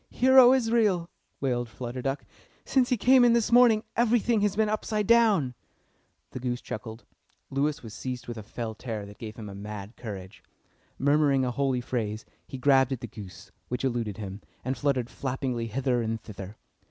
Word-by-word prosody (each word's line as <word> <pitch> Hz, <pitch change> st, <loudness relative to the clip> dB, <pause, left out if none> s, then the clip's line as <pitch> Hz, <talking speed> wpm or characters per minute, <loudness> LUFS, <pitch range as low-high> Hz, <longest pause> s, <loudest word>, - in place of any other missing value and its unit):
"Hear, 260 Hz, +1 st, +5 dB
O 250 Hz, -1 st, +9 dB
Israel!" 225 Hz, -9 st, +2 dB, 0.3 s
wailed 120 Hz, -3 st, -1 dB
Flutter 120 Hz, +2 st, -6 dB
Duck. 135 Hz, +2 st, -3 dB, 0.4 s
"Since 255 Hz, -2 st, +2 dB
he 250 Hz, -, +2 dB
came 255 Hz, +4 st, +5 dB
in 240 Hz, -1 st, +6 dB
this 235 Hz, -1 st, +1 dB
morning 235 Hz, -3 st, +6 dB
everything 235 Hz, -1 st, +2 dB
has 205 Hz, -1 st, +1 dB
been 220 Hz, 0 st, +2 dB
upside 215 Hz, 0 st, -1 dB
down." 210 Hz, -, +4 dB, 0.8 s
The -, -, -6 dB
goose 125 Hz, -1 st, -2 dB
chuckled. 110 Hz, +1 st, -7 dB, 0.5 s
Lewis 140 Hz, +1 st, -1 dB
was 110 Hz, -2 st, -9 dB
seized 125 Hz, 0 st, -5 dB
with 120 Hz, -, -5 dB
a -, -, -6 dB
fell 110 Hz, +2 st, -5 dB
terror 110 Hz, -2 st, -5 dB
that 100 Hz, 0 st, -13 dB
gave 110 Hz, -1 st, -7 dB
him 110 Hz, -4 st, -8 dB
a 100 Hz, -, -8 dB
mad 105 Hz, +1 st, -8 dB
courage. 100 Hz, -3 st, -8 dB, 0.5 s
Murmuring 140 Hz, -1 st, +3 dB
a 125 Hz, -, -1 dB
holy 130 Hz, -1 st, 0 dB
phrase, 110 Hz, -3 st, -3 dB, 0.2 s
he 135 Hz, -, -7 dB
grabbed 135 Hz, 0 st, +4 dB
at 130 Hz, -3 st, -3 dB
the -, -, -4 dB
goose, 95 Hz, -5 st, -11 dB, 0.2 s
which 125 Hz, +1 st, -3 dB
eluded 115 Hz, -5 st, -2 dB
him, 100 Hz, -1 st, -7 dB, 0.2 s
and 130 Hz, +1 st, -1 dB
fluttered 130 Hz, -5 st, 0 dB
flappingly 125 Hz, -3 st, -3 dB
hither 125 Hz, +1 st, 0 dB
and 115 Hz, 0 st, -2 dB
thither. 100 Hz, -1 st, -9 dB
130 Hz, 180 wpm, -27 LUFS, -, 0.8 s, O